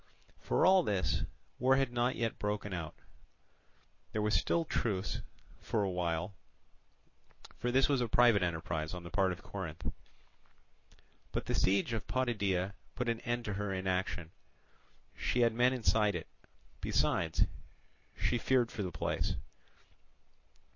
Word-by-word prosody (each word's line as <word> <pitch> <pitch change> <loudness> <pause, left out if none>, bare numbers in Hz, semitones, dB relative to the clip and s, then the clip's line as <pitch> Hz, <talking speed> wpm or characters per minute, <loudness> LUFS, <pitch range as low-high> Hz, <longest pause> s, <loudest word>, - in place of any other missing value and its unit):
For - - +2
all 190 0 +7
this, 95 - 0 0.3
war 130 +2 +5
had 135 -2 +1
not 120 +1 +1
yet 115 -1 -2
broken 105 -1 -2
out: 80 -3 -4 1.2
there 110 - 0
was 105 0 +1
still 165 -1 +2
truce 105 -9 -1 0.4
for 110 -3 0
a 95 - 0
while; 90 +1 -1 1.3
for 125 - 0
this 135 +2 +4
was 140 -3 +2
a 120 - +1
private 120 -2 +5
enterprise 80 -1 -2
on 90 - -7
the 85 - -9
part 95 -2 +2
of 90 - -7
Corinth. 85 -5 -6 1.5
But - - -2
the - - -1
siege 100 +5 +2
of 110 - -3
Potidæa 100 -7 0 0.2
put 125 -1 -1
an 115 -1 0
end 120 0 -2
to 105 - -2
her 100 0 -2
inaction; 95 -3 -1 0.8
she 125 - 0
had 115 -1 +4
men 125 +2 +4
inside 110 -5 +2
it: 85 - -4 0.6
besides, 80 -1 +2 0.7
she 120 - +1
feared 125 -1 +2
for 115 - -4
the 90 -2 -2
place. 80 - -1
105 Hz, 140 wpm, -33 LUFS, 90-120 Hz, 1.5 s, all